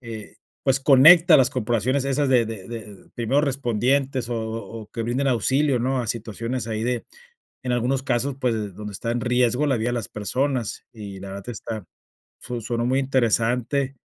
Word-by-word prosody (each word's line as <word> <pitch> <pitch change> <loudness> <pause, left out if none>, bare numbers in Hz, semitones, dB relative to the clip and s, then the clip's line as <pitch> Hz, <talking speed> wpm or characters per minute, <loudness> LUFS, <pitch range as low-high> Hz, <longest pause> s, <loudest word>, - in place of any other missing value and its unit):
eh, 115 -4 -9 0.3
pues 135 0 +3
conecta 155 +6 +8
las 130 -1 +4
corporaciones 130 +2 0
esas 140 +1 +1
de 125 -3 +4
de 110 -3 -7
de 110 -4 -9
primeros 130 +5 +1
respondientes 130 -1 0
o 120 - -2
o 115 0 -5
o - - -13
que 115 - -4
brinden 130 +4 0
auxilio, 130 +3 +2
¿no? 130 +2 0
A 120 - -4
situaciones 115 +2 -4
ahí 110 0 -2
de, 125 -1 -1 0.6
en 125 - -1
algunos 125 +2 0
casos, 130 +1 -1
pues 110 -6 -1
donde 105 0 -7
está 115 +4 -3
en 120 - -1
riesgo 125 +3 +2
la 135 -3 +2
vida 115 +2 -1
de - - -2
las 115 -3 -3
personas 125 +3 -2
y 100 -4 -8
la 100 - -8
verdad 100 +3 -8
está, 110 -2 -6 0.6
fun 120 -1 -5
sonó 120 +1 -2
muy 130 +2 +2
interesante. 130 +1 +1
120 Hz, 185 wpm, -23 LUFS, 115-130 Hz, 0.6 s, conecta